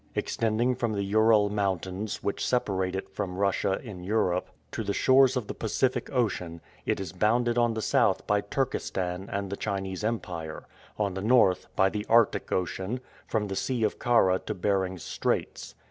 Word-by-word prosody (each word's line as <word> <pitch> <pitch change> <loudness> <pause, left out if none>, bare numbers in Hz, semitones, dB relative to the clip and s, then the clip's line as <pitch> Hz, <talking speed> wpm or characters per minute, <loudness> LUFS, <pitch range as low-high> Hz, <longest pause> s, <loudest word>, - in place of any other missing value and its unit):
Extending 115 +3 +1
from 120 -3 -1
the 100 -1 -1
Ural 105 0 +4
Mountains, 100 0 -2
which 100 - -2
separate 95 -7 0
it 95 - -4
from 90 -1 -5
Russia 100 -1 +1
in 100 -7 -8
Europe, 90 -3 0 0.2
to - - -3
the 100 -1 -2
shores 130 0 +5
of 125 - -2
the - - -5
Pacific 125 +3 -1
Ocean, 95 -10 -1 0.3
it - - +1
is 95 -4 -5
bounded 120 +5 +2
on 120 -1 +2
the 110 - -3
south - - +2
by 105 0 +2
Turkestan 95 -5 -2
and 100 -1 -3
the - - -1
Chinese 95 -2 -3
Empire; 90 -8 -3 0.3
on 100 -3 0
the 95 - -4
north 110 -4 +4
by 95 - +4
the 105 +2 -2
Arctic 115 -1 +3
Ocean, 95 +6 -2 0.3
from 105 -2 -1
the 95 - -4
Sea 125 +2 -1
of 105 - 0
Kara 95 -6 +3
to - - -5
Behring's 95 -1 -1
Straits. - - -2
100 Hz, 175 wpm, -28 LUFS, 95-115 Hz, 0.3 s, shores